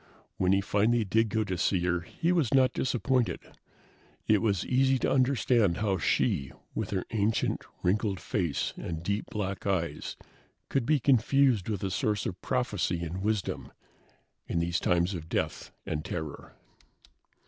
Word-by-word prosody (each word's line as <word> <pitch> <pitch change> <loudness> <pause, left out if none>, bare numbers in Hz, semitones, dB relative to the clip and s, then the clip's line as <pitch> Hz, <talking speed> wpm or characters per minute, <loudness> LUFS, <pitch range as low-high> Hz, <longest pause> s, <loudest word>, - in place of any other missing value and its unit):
When 95 -1 +2
he 95 0 +4
finally 110 +4 +2
did 110 +3 +2
go 110 +1 +1
to 95 -4 -3
see 95 0 +2
her, 90 0 +1
he 165 - -2
was 165 -9 +2
not 130 -1 +4
disappointed. 125 -1 0 0.9
It 105 -2 +4
was 100 -5 +1
easy 130 +1 +3
to - - 0
understand 125 -7 +3
how 100 -4 0
she, 70 -3 +1 0.2
with 110 -3 -3
her 95 -2 -2
ancient, 110 0 0 0.2
wrinkled 100 +1 +1
face 85 -3 -1
and 80 -1 -5
deep 100 +3 -1
black 100 -1 -3
eyes, 90 -4 -2 0.5
could 135 -4 0
be 155 -1 +4
confused 130 -3 +3
with 100 -3 -2
a 95 - -1
source 105 -2 0
of 90 -1 -4
prophecy 105 -9 -1
and 85 +3 -4
wisdom 105 -1 -2 0.8
in - - -2
these 85 +1 +1
times 90 +2 +1
of 80 -2 -6
death - - -2 0.2
and 75 -1 -3
terror. 80 -4 -6
100 Hz, 155 wpm, -29 LUFS, 90-120 Hz, 0.9 s, he